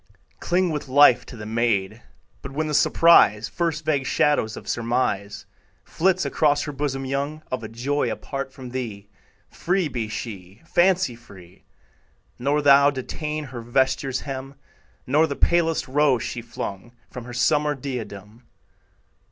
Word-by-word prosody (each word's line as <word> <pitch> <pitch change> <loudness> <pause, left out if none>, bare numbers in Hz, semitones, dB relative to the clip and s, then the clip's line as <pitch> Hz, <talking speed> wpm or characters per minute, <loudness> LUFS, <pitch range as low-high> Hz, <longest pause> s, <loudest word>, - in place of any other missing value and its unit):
Cling 180 0 +1
with 150 -2 -4
life 130 -2 +5
to 120 - -10
the 105 - -8
maid; 110 -1 -1 0.4
But 135 - -8
when 155 +3 -1
the 150 - -3
surprise, 115 -10 +5
First 165 0 -2
vague 140 -4 0
shadow 150 -5 +2
of - - -10
surmise 115 -4 -2 0.4
Flits 185 +2 +1
across 145 -2 +2
her 150 - -4
bosom 135 -1 -3
young, 140 +3 -3
Of 130 -1 -2
a - - -5
joy 130 +6 -1
apart 135 -1 -5
from 130 -2 -10
thee, 110 -6 -6 0.4
Free 180 -1 0
be 120 -5 -3
she, 100 - -8
fancy 175 -6 +2
free; 95 -6 -16 0.7
Nor 145 +4 0
thou 140 0 +7
detain 150 +3 -4
her 130 -4 -8
vesture's 130 +2 0
hem, 135 0 -7 0.5
Nor 150 +5 +3
the 140 - -4
palest 165 0 +1
rose 135 -2 +2
she 120 - -5
flung 115 -1 -7 0.2
From 125 -2 -8
her 125 - -9
summer 150 +4 +2
diadem. 120 -4 -7
135 Hz, 145 wpm, -23 LUFS, 120-150 Hz, 0.7 s, thou